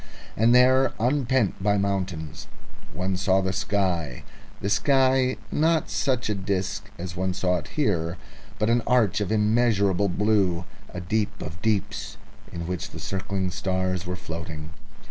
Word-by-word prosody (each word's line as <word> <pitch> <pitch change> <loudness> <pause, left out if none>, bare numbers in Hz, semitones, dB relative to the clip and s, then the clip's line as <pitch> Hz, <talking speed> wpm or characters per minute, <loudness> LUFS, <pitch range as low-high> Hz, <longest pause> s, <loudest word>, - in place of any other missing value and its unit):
And 115 +3 +4
there, 130 +1 +5
unpent 125 -4 +1
by 100 +1 +2
mountains, 95 -6 -2 0.4
one 95 +1 -2
saw 95 0 +3
the 95 0 -1
sky 95 - -1 0.4
the - - -3
sky, 130 +3 +3
not 160 +1 +2
such 130 -3 0
a 105 - +1
disc 100 +1 -2
as 90 0 -6
one 95 0 -1
saw 90 -1 +1
it 80 - -6
here, 90 - +1 0.4
but 105 - +1
an 120 0 +3
arch 115 -6 +3
of 105 - -1
immeasurable 105 -3 +2
blue, 95 -3 +1 0.2
a 90 - -6
deep 105 +4 -1
of 85 +3 -7
deeps 110 -4 -1 0.3
in 85 -1 -5
which 90 -1 -4
the - - -9
circling 95 -1 -2
stars 95 -1 -1
were 90 - -2
floating... 80 -3 -7
100 Hz, 145 wpm, -25 LUFS, 90-110 Hz, 0.4 s, there